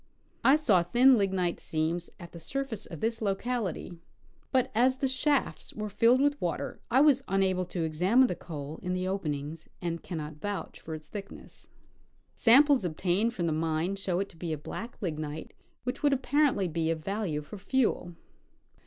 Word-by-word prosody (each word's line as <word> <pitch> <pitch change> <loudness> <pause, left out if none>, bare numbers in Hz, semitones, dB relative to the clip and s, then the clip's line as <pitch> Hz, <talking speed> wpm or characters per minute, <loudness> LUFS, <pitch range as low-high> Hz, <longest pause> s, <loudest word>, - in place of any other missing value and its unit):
I 270 - +7
saw 230 - +4
thin 245 +10 +5
lignite 190 -4 0
seams 160 +2 -2
at 170 -2 -10
the 170 - -10
surface 255 - -4
at 165 -5 -8
this 225 0 -1
locality, 200 -4 -2 0.5
but 260 -2 +2
as 255 +4 +3
the 270 - 0
shafts 275 +1 -1
were 215 0 -4
filled 235 +6 +4
with 290 0 +1
water - - -3
I 260 +3 +5
was 285 -3 +5
unable 190 -1 +1
to 175 -1 -3
examine 180 +11 +3
the 215 - 0
coal 150 -2 -7
in 180 -1 -2
the 185 0 -1
open 185 -6 -1
ings, 150 +3 -7
and 170 -1 -3
cannot 155 -3 -6
vouch 205 -1 -4
for 160 - -6
its 155 -1 -11
thickness. 200 -2 -10 0.6
Samples 275 +1 +6
obtained 185 +7 0
from 175 - -1
the 165 - +1
mine 160 +4 0
show 190 -2 -1
it 195 - -2
to 165 - -16
be 165 -1 -4
a 155 - -1
black 230 +10 -7
lignite 155 -3 -4 0.3
which 250 +1 -3
would 290 -1 +4
apparently 270 -6 +2
be 165 -1 -1
of 160 -1 -2
value 195 -7 -2
for 200 +7 -10
fuel. 205 -5 0
190 Hz, 180 wpm, -29 LUFS, 165-245 Hz, 0.6 s, I